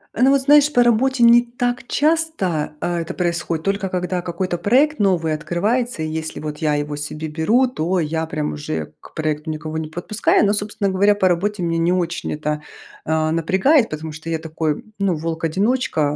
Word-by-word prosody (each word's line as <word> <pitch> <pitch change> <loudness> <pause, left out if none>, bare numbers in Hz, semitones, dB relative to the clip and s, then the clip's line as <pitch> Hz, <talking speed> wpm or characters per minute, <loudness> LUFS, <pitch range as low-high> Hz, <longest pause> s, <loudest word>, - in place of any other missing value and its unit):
Э, 235 - -2
ну, 265 - +6
вот 275 -1 +3
знаешь, 295 +1 +5
по 245 - +5
работе 240 +2 +2
не 235 +1 +7
так 245 0 -3
часто, 295 - 0
а, 175 -1 -1
это 165 - -4
происходит 170 -2 -2
только, 195 -1 -1
когда 180 0 -2
какой-то 175 +1 -3
проект 270 +5 +3
новый 175 -6 +2
открывается, 200 +6 -1
и - - -2
если 160 0 -4
вот 150 -1 -5
я 150 -2 +1
его 145 0 -2
себе 150 +2 -5
беру, 210 +12 +2
то 180 -5 -1
я 160 +1 -1
прям 150 - -3
уже 75 +1 -5
к - - -16
проекту 155 0 -2
никого 155 0 -4
не 155 -1 -5
подпускаю. 190 +5 +1
Но, 205 - +2
собственно 205 -1 -1
говоря, 200 +2 +3
по 190 -2 +2
работе 185 +2 0
меня 165 -1 0
не 170 +2 +2
очень 170 -2 -1
это, 150 0 -3 0.4
э, 155 0 +1
напрягает, 190 - +3
потому 155 +1 -5
что 160 +2 -8
я 165 - 0
такой, 160 -1 -3 0.2
ну, 190 -4 +1
волк-одиночка, 165 +7 -1
175 Hz, 190 wpm, -20 LUFS, 155-220 Hz, 0.4 s, не